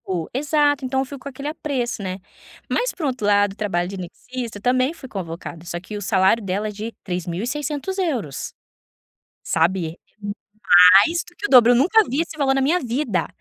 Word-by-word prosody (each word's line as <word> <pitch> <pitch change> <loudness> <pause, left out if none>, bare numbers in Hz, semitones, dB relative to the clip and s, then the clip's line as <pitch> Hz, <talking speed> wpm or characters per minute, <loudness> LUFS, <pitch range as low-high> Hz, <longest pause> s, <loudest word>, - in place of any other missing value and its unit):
O 175 -4 -3
exato, 290 +1 +1
então 265 +1 0
eu - - -2
fico 280 +1 -9
com 280 - -7
aquele 275 +2 -7
apreço, 270 -7 -3
né, 185 -1 -4 0.5
mas, - - 0
por 330 - -5
outro 255 -6 -2
lado, 205 -1 +3
o - - -19
trabalho 175 -5 -1
de 195 - -6
anestesista, 230 +6 -7
eu - - -13
também 255 +5 +2
fui 285 -5 -11
convocada, 170 -5 -7
só 175 0 -4
que 200 +4 -9
o 205 - -5
salário 195 +2 +2
dela 200 +2 -2
é - - -5
de 215 +3 -6
3.600€, 245 - -3 0.9
sabe. 170 0 +1
É - - -40 1.0
mais 340 +1 -1
do 355 - -17
que 410 - -5
o - - -1
dobro, 245 -2 +7
eu - - +5
nunca 375 - +5
vi 275 +6 +1
esse 330 -1 -6
valor 275 -2 +2
na 270 - +1
minha 315 +7 +2
vida 240 - -1
245 Hz, 195 wpm, -22 LUFS, 190-285 Hz, 1.0 s, dobro